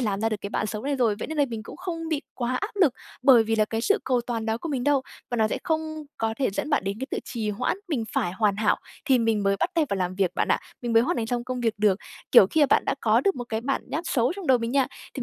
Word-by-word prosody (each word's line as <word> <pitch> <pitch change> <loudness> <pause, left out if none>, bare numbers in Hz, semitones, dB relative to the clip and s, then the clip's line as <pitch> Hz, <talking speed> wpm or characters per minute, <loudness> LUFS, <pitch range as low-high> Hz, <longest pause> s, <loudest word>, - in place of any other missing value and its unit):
làm 205 -4 -1
ra 225 - +2
được 215 - -1
cái 200 - -6
bạn 215 - -1
xấu 215 0 -4
này 280 0 -1
rồi, 230 -5 +2
vậy - - -4
nên 315 - -4
là 285 - +5
mình 225 -2 -5
cũng - - -10
không 335 -3 -5
bị 305 -2 -1
quá 250 0 -2
áp 410 +1 -5
lực 295 -9 +5 0.3
bởi 245 -5 +7
vì 225 0 0
là 215 - +4
cái 225 +1 -3
sự 410 - +2
cầu 250 -2 +2
toàn 230 -2 -3
đó 220 +1 0
của 330 - -6
mình 260 -4 -2
đâu", 285 -2 +3 0.3
và 240 - -1
nó 220 -1 +3
sẽ - - -2
không 315 -1 -2
có 225 0 -1
thể 270 - +1
dẫn 290 +10 -3
bạn 290 - +2
đến 200 +1 -2
cái 265 - -3
tự - - -1
trì 220 -4 -3
hoãn, 230 - -1
mình 260 -9 -1
phải 175 - 0
hoàn 205 -1 +1
hảo 215 -1 +2 0.3
thì 265 -4 +4
mình 225 -3 +1
mới 195 0 +2
bắt - - 0
tay 325 -2 +3
vào 200 - -1
làm 180 -1 -1
việc 190 -2 0
bạn - - 0
ạ. - - +3 0.2
Mình 240 -1 -2
mới 230 0 +6
hoàn - - 0
thành 225 - -1
xong 240 +1 -2
công 255 -1 -4
việc 225 -2 +1
được. 205 -2 +3 0.3
Kiểu 190 - +9
khi 315 - 0
mà - - +6
bạn - - +4
đã - - 0
có - - +3
được 395 -1 +1
một 245 - -4
cái 220 0 -2
bản 270 +3 -1
nháp 320 +4 -2
xấu 245 +2 +1
trong 380 -5 -6
đầu 255 -2 +5
mình 230 0 -3
nha, 275 -2 +3 0.3
thì 255 - -3
240 Hz, 320 wpm, -25 LUFS, 215-280 Hz, 0.3 s, Kiểu